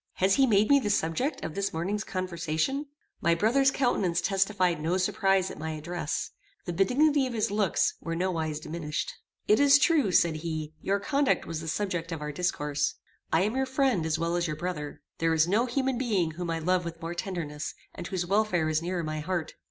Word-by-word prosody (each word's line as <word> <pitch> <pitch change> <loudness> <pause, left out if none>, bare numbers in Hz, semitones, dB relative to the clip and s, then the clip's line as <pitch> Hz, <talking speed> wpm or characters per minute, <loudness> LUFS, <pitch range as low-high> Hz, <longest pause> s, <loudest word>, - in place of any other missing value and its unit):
Has 190 +1 +2
he 270 +3 +4
made 210 -2 +4
me 280 - +7
the 210 - -2
subject 205 - 0
of 160 - -4
this 200 +2 -1
morning's 195 +6 -2
conversation?" 185 - -2 0.3
My 170 0 +3
brother's 245 +9 +3
countenance 205 -10 +1
testified 190 -4 +1
no 170 +4 +1
surprize 190 0 +1
at - - -10
my 160 +1 -3
address. 155 0 -3 0.3
The 175 - -3
benignity 270 - +3
of 250 - -5
his 215 -2 0
looks 205 -2 +1
were 165 0 -3
no 185 +2 0
wise 160 -3 -2
diminished. 155 -1 -4 0.3
"It 210 - +5
is 285 0 +7
true," 290 - +3
said 170 -2 +3
he, 155 -1 -4
"your 200 +1 0
conduct 280 +4 +1
was 160 -1 -4
the 160 - -7
subject 175 -1 -2
of 165 - -3
our 150 0 -4
discourse. 150 -2 -1 0.4
I 160 - +4
am 210 +5 0
your 265 0 0
friend, 260 - +1
as 160 0 0
well 170 +1 -1
as 175 0 0
your 155 - -3
brother. 150 -3 -5 0.2
There 165 0 +2
is 160 +1 +4
no 220 +7 +2
human 260 0 0
being 200 -10 +1
whom 170 +2 -5
I 165 - 0
love 180 +2 +1
with 165 -1 -6
more 165 +1 -4
tenderness, 165 -5 -4 0.2
and 175 - -7
whose 180 -2 -2
welfare 185 -4 +1
is 155 0 +1
nearer 175 0 -2
my 155 0 -3
heart. 170 0 -3
180 Hz, 205 wpm, -28 LUFS, 160-210 Hz, 0.4 s, me